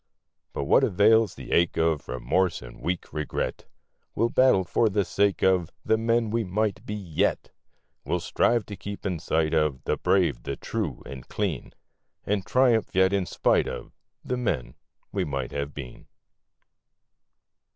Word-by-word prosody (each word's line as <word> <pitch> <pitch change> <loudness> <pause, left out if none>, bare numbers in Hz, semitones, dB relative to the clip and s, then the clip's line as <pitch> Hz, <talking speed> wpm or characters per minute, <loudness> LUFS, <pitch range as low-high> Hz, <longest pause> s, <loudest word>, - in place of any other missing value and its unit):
But - - -2
what - - +4
avails 110 +2 +4
the - - -9
ache 85 0 +2
of 80 -2 +1
Remorse 65 +8 0
or - - -9
weak 90 0 -4
regret? 75 -2 -3 0.5
We'll 115 - +2
battle 130 -7 +4
for 110 +5 +2
the 100 -1 +1
sake 100 -1 +1
of 90 -3 +3 0.2
The - - +3
men 115 0 +1
we 115 0 +1
might 105 +1 -1
be 105 - -3
yet! 90 -7 -1 0.5
We'll - - -1
strive 115 -3 +1
to 105 - -7
keep 100 +1 -8
in 90 -4 -1
sight 80 0 0
of 75 -5 +1
The - - 0
brave, 90 -11 +2
the 70 - -4
true, - - -4
and 65 -2 -9
clean, 95 -10 -3 0.5
And 100 -1 0
triumph 120 -3 +2
yet 95 +1 +4
in 95 -3 0
spite - - +2
of - - -6 0.3
The 125 - -1
men 110 - -2 0.4
we - - -1
might 70 -4 -3
have 70 0 -3
been. 65 -4 -9
95 Hz, 160 wpm, -26 LUFS, 75-105 Hz, 0.5 s, what